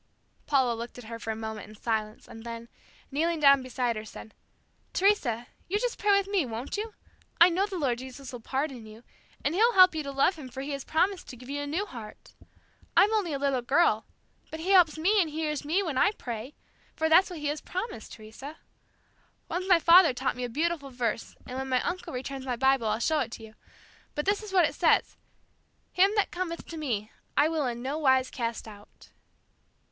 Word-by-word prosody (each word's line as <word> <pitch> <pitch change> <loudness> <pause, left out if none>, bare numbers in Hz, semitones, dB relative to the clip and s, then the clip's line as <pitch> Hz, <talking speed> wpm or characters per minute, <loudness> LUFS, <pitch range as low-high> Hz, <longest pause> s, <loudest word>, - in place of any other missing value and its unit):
Paula 265 -4 +3
looked 235 +2 -7
at 245 - -9
her 230 +1 -8
for 225 - -7
a 220 - -1
moment 220 -1 -6
in 215 - -13
silence 215 0 -3
and 225 - -11
then, 230 0 -7 0.4
kneeling 325 +4 0
down 280 -2 +6
beside 250 -2 -1
her, 215 - -5
said, 220 0 -11 0.6
"Teresa, 280 - +2 0.2
you 400 - 0
just 485 +2 -2
pray 415 - 0
with 400 - +1
me, 395 -4 +1
won't 235 +1 -5
you? 430 +1 -5 0.4
I 340 +2 +9
know 375 +4 +1
the 390 -3 -5
Lord 255 -7 0
Jesus 260 +1 -9
will 245 - -6
pardon 265 -1 -3
you, 215 +2 -13 0.4
and 290 - +1
He'll 460 +6 +4
help 370 -3 +7
you 315 - -2
to 280 -1 -5
love 275 +6 +2
Him 270 -4 -9
for 260 +2 -7
He 280 +2 -5
has 275 -1 -4
promised 365 +4 0
to - - -8
give 250 +2 -13
you 285 0 -2
a 285 - -4
new 345 +8 -1
heart. 230 - -11 0.6
I'm 420 +3 +6
only 405 -7 +1
a 280 - -1
little 275 -2 0
girl, 245 -4 +2 0.4
but 315 - -7
He 370 +4 -1
helps 350 -5 +5
me 390 +6 +3
and 330 - 0
He 310 +2 -4
hears 300 -2 -2
me 335 +7 +1
when 295 -8 -1
I 415 - +4
pray, 240 - -7 0.4
for 320 - +1
that's 350 +5 +5
what 355 - -7
He 300 - -6
has 295 0 -3
promised, 370 - -5
Teresa. 230 +8 -10 0.9
Once 360 +3 -3
my 365 - +7
father 335 -1 +7
taught 260 +1 -1
me 250 - -5
a 245 - -3
beautiful 305 +2 -1
verse, 235 -3 -3
and 255 +1 -5
when 265 0 -4
my 255 -1 +2
uncle 360 +1 -3
returns 265 +1 -5
my 255 -2 -2
Bible, 265 -1 +2
I'll 215 0 +1
show 310 +7 +1
it 250 -5 -1
to 225 - -9
you, 220 0 -12 0.6
but 295 - -2
this 405 +1 +1
is 425 -2 -8
what 365 -3 +5
it - - -6
says, - - +2 0.8
'Him 380 +2 +4
that 415 - +1
cometh 350 -2 -3
unto 330 - -9
Me, 225 -8 -3 0.3
I 290 - +5
will 310 -4 0
in 240 0 -4
no 280 +4 -2
wise 260 -3 +3
cast 230 -2 -4
out.'" 205 -1 -15
275 Hz, 220 wpm, -28 LUFS, 240-340 Hz, 0.9 s, I